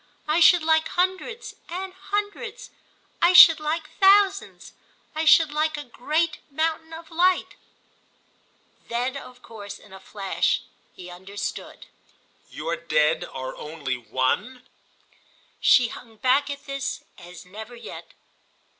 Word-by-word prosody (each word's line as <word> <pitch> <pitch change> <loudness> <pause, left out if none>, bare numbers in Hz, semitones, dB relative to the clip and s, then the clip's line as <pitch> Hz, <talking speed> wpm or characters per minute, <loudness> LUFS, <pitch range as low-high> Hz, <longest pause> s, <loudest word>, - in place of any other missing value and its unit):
I 305 +3 +2
should 345 0 +6
like 320 0 +2
hundreds 375 +6 -2 0.2
and 370 +2 -5
hundreds—I 410 -1 -4
should 330 -3 +10
like 310 +1 -3
thousands; 395 0 +3 0.4
I 315 +1 -2
should 315 -1 +6
like 310 0 0
a 295 - -5
great 305 +5 -2
mountain 320 +2 -2
of 325 0 -11
light." 360 +2 +1 1.3
Then 245 +3 -2
of 255 -2 -11
course 205 -3 -9
in 190 - -18
a 190 - -10
flash 195 -1 -1 0.3
he 180 -1 -10
understood. 195 +3 -7 0.6
"Your - - -4
Dead 155 - +1
are 130 0 -7
only 150 -4 -5
One?" 130 - -2 0.9
She 245 -3 +5
hung 225 -1 -12
back 260 +5 +2
at 285 0 -7
this 275 0 -4 0.2
as 180 +1 -12
never 220 +6 -10
yet. 235 - -11
295 Hz, 120 wpm, -24 LUFS, 210-340 Hz, 1.3 s, should